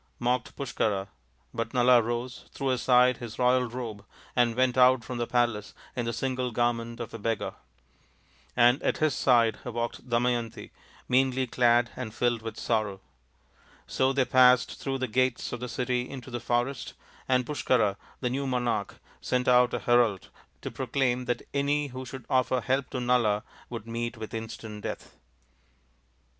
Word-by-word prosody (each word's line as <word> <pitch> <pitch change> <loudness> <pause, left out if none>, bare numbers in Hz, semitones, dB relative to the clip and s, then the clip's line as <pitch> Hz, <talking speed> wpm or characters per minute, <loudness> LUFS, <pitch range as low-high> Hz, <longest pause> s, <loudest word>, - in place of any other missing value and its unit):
" - - -40
mocked 125 +1 -1
Push 140 -3 -5
kara, 100 -2 -1 0.4
but 115 +1 -4
Nala 125 0 +6
rose, 120 +2 -4
threw 135 -2 -1
aside 125 0 +4
his 115 -2 -8
royal 125 0 +3
robe, 115 -4 -6 0.3
and 120 -2 +3
went 130 0 +2
out 130 -1 +5
from 125 +1 -5
the 120 - -1
palace 120 -4 0 0.2
in 120 -2 -2
the 115 - -1
single 130 +1 -2
garment 115 0 -1
of 120 - -6
a 115 - -6
beggar. 115 0 -2 1.0
And 125 +4 +5
at - - 0
his 155 -3 +2
side 115 -4 +3
walked 120 +1 -4
Damayanti, 120 -1 -1 0.4
meanly 130 0 +2
clad 120 -1 +3
and 115 -4 -6
filled 120 -2 +1
with 115 0 -6
sorrow. 110 -4 -1 0.9
So 130 0 +1
they 135 -1 +2
passed 125 -1 +4
through 135 -1 -2
the 130 0 -2
gates 130 +1 0
of 120 - -4
the 125 +1 -5
city 125 0 -1
into 130 -2 -8
the 120 - -3
forest, 120 +2 -2 0.3
and 125 -1 +3
Pushkara, 125 -8 +1 0.3
the 125 - 0
new 135 +2 -2
monai^h, 120 -5 -1 0.3
sent 125 0 -1
out 125 -1 +5
a - - -3
herald 120 -5 +2 0.3
to - - -4
proclaim 125 -1 -1
that 120 - -2
any 145 +1 +1
who 130 +1 -7
should 130 -1 -8
offer 130 0 +2
help 130 +1 0
to 130 - -3
Nala 120 -4 +2 0.3
would 115 -3 -6
meet 115 +1 -4
with 110 0 -7
ii^ant 110 -2 -7
death. - - -6
125 Hz, 165 wpm, -28 LUFS, 115-130 Hz, 1.0 s, Nala